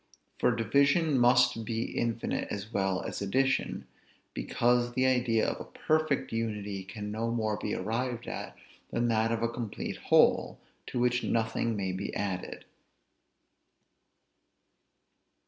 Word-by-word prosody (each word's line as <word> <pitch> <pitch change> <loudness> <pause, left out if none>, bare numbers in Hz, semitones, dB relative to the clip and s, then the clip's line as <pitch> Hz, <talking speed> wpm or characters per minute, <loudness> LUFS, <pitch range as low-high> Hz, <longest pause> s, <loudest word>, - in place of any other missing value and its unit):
For 125 - +3
division 140 +6 +3
must 120 -2 +4
be 115 0 -2
infinite 115 -1 -1
as 105 +3 -5
well 95 -1 0
as - - -5
addition; 135 +7 0 0.5
because 120 0 +1
the 130 +1 +2
idea 125 -3 +2
of - - -3
a - - -7
perfect 155 -2 0
unity 105 -4 -3
can 105 +2 -6
no 115 +2 -2
more 110 -2 0
be 105 - -2
arrived 120 +4 -2
at, - - -6 0.3
than 120 0 0
that 115 0 +2
of 115 0 -1
a - - +3
complete 115 -2 -5
whole, - - +3 0.3
to - - -4
which 125 0 +2
nothing 115 0 0
may 95 -2 -1
be 95 +2 -4
added. 95 -3 -4
115 Hz, 130 wpm, -30 LUFS, 105-125 Hz, 0.5 s, must